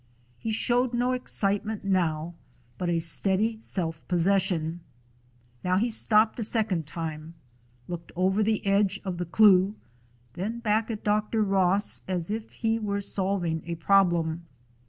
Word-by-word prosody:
He 225 - -3
showed 245 +2 +1
no 245 +1 +1
excitement 210 -4 0
now, 170 -4 0 0.5
but 180 - -1
a 170 - +1
steady 195 +6 0
self 165 -7 -2
possession. 175 -2 +1 0.8
Now 185 0 +1
he 230 +4 +1
stopped 220 +1 +4
a - - -1
second 210 -8 0
time, 160 0 -6 0.5
looked 170 -1 -7
over 190 +3 +1
the 215 0 0
edge 200 0 +2
of 180 -2 -4
the 175 - -2
cleuch, 195 +1 +4 0.6
then 210 +6 -4
back 220 -1 0
at 215 -2 -5
Dr. 215 +1 +1
Ross, 195 0 +2
as 180 0 -3
if 220 +1 -4
he 225 -1 -1
were 200 -2 -2
solving 190 -5 -1
a 170 - -3
problem. 170 -2 +1
195 Hz, 140 wpm, -26 LUFS, 175-215 Hz, 0.8 s, stopped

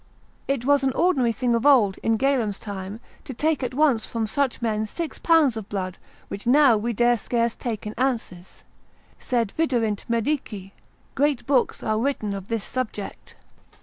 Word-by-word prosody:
It 270 -3 -1
was 285 0 +4
an 265 -1 +1
ordinary 270 -8 +2
thing 240 +1 0
of 230 0 +1
old, 245 -9 +4
in 225 0 +1
Galen's 240 -6 +1
time, 200 0 -7 0.2
to 265 - -8
take 310 +3 0
at 250 -1 -3
once 280 -6 +3
from 230 -1 -2
such 270 +4 -1
men 220 -2 -1
six 330 +8 -5
pounds 320 -7 +4
of 215 -2 -7
blood, 185 -2 -4 0.3
which 200 - -6
now 270 -1 +6
we 220 +3 -1
dare 240 +1 +2
scarce 235 +1 0
take 225 -4 -4
in 210 - -4
ounces: 225 -9 -3 0.6
sed 235 -5 -1
viderint 235 -10 0
medici; 230 -5 -2 0.4
great 280 -2 +1
books 270 -3 +1
are 215 0 0
written 230 -5 -1
of 195 -1 -6
this 225 -3 -2
subject. 230 -5 -5
235 Hz, 170 wpm, -24 LUFS, 215-270 Hz, 0.6 s, now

